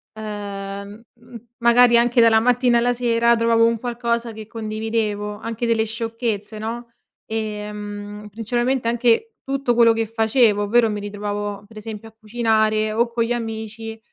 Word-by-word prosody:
Uhm, 200 0 -7 0.2
m 240 +1 -16 0.2
magari 235 0 +6
anche 240 +1 +4
dalla 225 -1 +6
mattina 245 +1 +3
alla 245 +1 +2
sera 235 -1 +2
trovavo 230 0 +3
un 230 0 +1
qualcosa 235 -1 -2
che 215 -1 -9
condividevo, 215 -2 -3
anche 230 +1 -4
delle 225 -1 +2
sciocchezze, 225 -2 -4
no? 235 +2 -5 0.4
Ehm, 210 -1 -5
principalmente 240 +3 -1
anche 240 - +2
tutto 275 -2 0
quello 230 -1 +6
che 225 0 -1
facevo, 225 -1 +2
ovvero 225 +2 +3
mi 210 - -3
ritrovavo 205 0 -4
per 220 +1 -15
esempio 215 0 -8
a 220 - -27
cucinare 220 -1 +1
o 235 +2 +1
con 235 0 0
gli 235 - -4
amici, 225 -1 -5
225 Hz, 150 wpm, -21 LUFS, 210-235 Hz, 0.4 s, magari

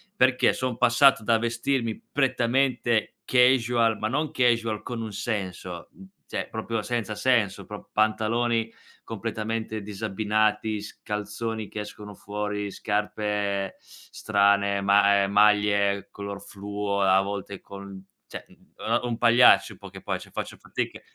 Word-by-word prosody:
perché 130 -6 +4
son 130 -3 -3
passato 120 -1 +5
da 115 0 +3
vestirmi 115 0 -1
prettamente 125 -3 +1
casual, 120 -3 +3
ma 110 - -2
non 150 +4 -1
casual 115 -6 +1
con 120 -2 -5
un 110 -2 -6
senso, 95 -5 -4 0.4
cioè, - - -4
proprio 110 0 -3
senza 110 -1 -3
senso: 105 -4 +1
pro 105 -1 -10
pantaloni 115 +2 +1 0.4
completamente 110 0 -4
disabbinati, 105 +1 -1
s 105 - -11
calzoni 105 +1 -4
che 105 - -6
escono 105 0 -9
fuori, 105 0 -4
scarpe 105 -1 -2
strane, 100 -1 0
ma 100 0 +4
ehm, 100 - -2
maglie 100 -1 +3
color 100 0 -7
fluo, 100 0 -3
a 95 0 +5
volte 100 0 -5
col 100 0 -10
n 95 -1 -10 0.2
cioè, - - -8 0.3
uno 115 +2 0
un 120 -2 -2
pagliaccio 120 +1 +5
in - - -17
poche - - -11
poe - - -2
cioè, - - -13
faccio - - -5
fatica - - -5
110 Hz, 135 wpm, -26 LUFS, 100-115 Hz, 0.4 s, passato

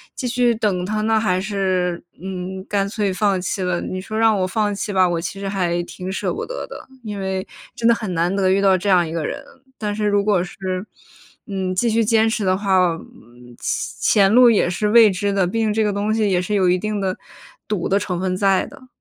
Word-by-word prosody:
继 255 - -3
续 245 -1 +2
等 205 -5 0
他 215 +3 -2
呢， 220 0 +2
还 185 -4 +1
是， 185 -3 -1 0.2
嗯， 190 +1 -6
干 200 -1 0
脆 205 -3 -1
放 195 -1 +1
弃 190 +2 -3
了。 180 -1 0
你 185 0 -4
说 215 +3 -5
让 225 -1 +4
我 185 - +1
放 205 +1 0
弃 205 +1 -4
吧， 185 -2 +4
我 170 -1 -1
其 195 +3 -5
实 200 - -4
还 175 -3 -1
挺 185 +2 -7
舍 190 - -2
不 - - -4
得 - - -5
的， - - -11 0.2
因 210 -2 -5
为 190 -1 -3 0.3
真 230 - 0
的 235 - +6
很 215 -4 -4
难 175 +4 +1
得 190 -1 +2
遇 190 +1 +3
到 195 -1 +4
这 185 +2 -2
样 180 -3 +4
一 - - -7
个 165 -2 -2
人， - - -4 0.3
但 210 -1 -3
是 210 -1 -1
如 205 0 +2
果 200 -4 +2
是， 185 0 -4 0.6
嗯， 190 -2 -3
继 230 +5 +1
续 225 +1 +2
坚 225 0 +3
持 225 -2 -1
的 185 0 +2
话， 190 -3 +3
嗯， 120 -5 -15
前 205 - +1
前 195 - +3
路 245 0 +7
也 210 -6 +3
是 195 +4 -1
未 220 -1 +7
知 200 +2 -1
的。 195 -2 +2
毕 225 +6 -2
竟 220 -1 +1
这 220 +1 +1
个 210 -1 0
东 205 +1 -1
西 220 -1 +1
也 180 - +2
是 205 +3 -2
有 190 -2 +3
一 180 0 +3
定 215 0 -2
的 190 -1 -1 0.5
赌 205 -5 -1
的 195 - +2
成 185 -3 -3
分 185 0 -1
在 195 -1 +2
的。 255 - -14
195 Hz, 260 characters per minute, -20 LUFS, 185-215 Hz, 0.6 s, 路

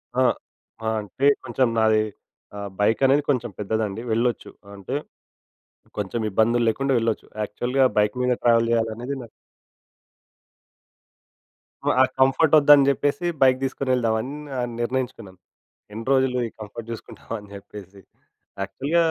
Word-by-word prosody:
ఆ! 130 - +3 0.6
ఆ! - - +1
అంటే 120 +7 -1 0.2
కొంచెం 125 0 +1
నాది 110 -1 +4 0.5
ఆహ్, 100 0 -5
బైక్ 110 +2 +2
అనేది 140 +2 +4
కొంచెం 120 -4 +1
పెద్దదండి 105 0 -2
వెళ్ళొచ్చు. 120 +1 0 0.2
ఆహ్, 100 - -12
అంటే 100 +7 -5 1.0
కొంచెం 105 +3 -2
ఇబ్బందులు 115 +4 +2
లేకుండా 135 +4 0
వెళ్ళొచ్చు. 115 -1 -1 0.2
యాక్చువల్‌గా 125 +6 0
బైక్ 105 0 +2
మీద 125 - +2
ట్రావెల్ 115 -1 +4
చేయాలనేది 115 +3 -1
నా 115 - -10 2.6
ఆ! - - +2
ఆ - - +8 0.2
కంఫర్ట్ 135 +4 +3
వద్దని 145 -1 +7
జెప్పేసి 145 +5 0 0.2
బైక్ 130 -1 +5
తీసుకొని 135 0 -2
వెళ్దామని 115 +1 0 0.5
నిర్ణయించుకున్నాను. 120 -6 -4 0.5
ఎన్ని 115 +2 -6
రోజులు 130 -1 +2
ఈ - - -14
కంఫర్ట్ 110 +2 -8
జూసుకుంటాం 115 0 -9
అని 105 -1 -13
చెప్పేసి 100 -1 -12 0.6
యాక్చువల్‌గ 135 - -2
115 Hz, 125 wpm, -23 LUFS, 110-130 Hz, 2.6 s, ఆ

